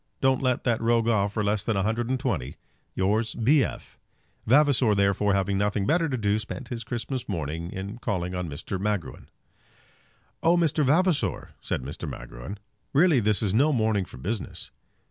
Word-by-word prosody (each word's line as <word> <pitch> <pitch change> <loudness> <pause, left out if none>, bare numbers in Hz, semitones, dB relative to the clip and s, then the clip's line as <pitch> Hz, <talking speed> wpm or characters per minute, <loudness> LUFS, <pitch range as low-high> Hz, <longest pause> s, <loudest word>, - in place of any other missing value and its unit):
Don't 135 -1 +2
let 125 -2 +1
that 120 -3 +1
rogue 115 0 +2
off 100 -3 +2
for 105 - -1
less 105 0 0
than 110 -2 0
a 95 - +1
hundred 115 +3 -1
and 130 0 0
twenty. 95 - -2 0.4
Yours, 105 +4 +1
B. 135 +5 +4
F." - - -7 0.5
Vavasor, 130 -4 +4
therefore, 100 0 +2
having 95 0 0
nothing 100 -1 0
better 165 - +2
to 130 - -1
do, 105 -1 +1
spent 115 +3 -7
his 115 -2 -4
Christmas 125 +1 -4
morning 85 -1 -3
in 100 +4 -6
calling 90 -6 -2
on 90 -2 -3
Mr. 80 +6 -5
Magruin. 100 -3 -3 1.1
"Oh, 170 +2 +4
Mr. 160 -3 +2
Vavasor," 165 +4 +2
said 65 - -3
Magruin; 65 +2 -7 0.4
"really 155 -1 +5
this 105 -3 +1
is 100 -3 0
no 140 +8 +4
morning 110 -6 +1
for - - -13
business!" 100 - -5
110 Hz, 170 wpm, -26 LUFS, 95-125 Hz, 1.1 s, really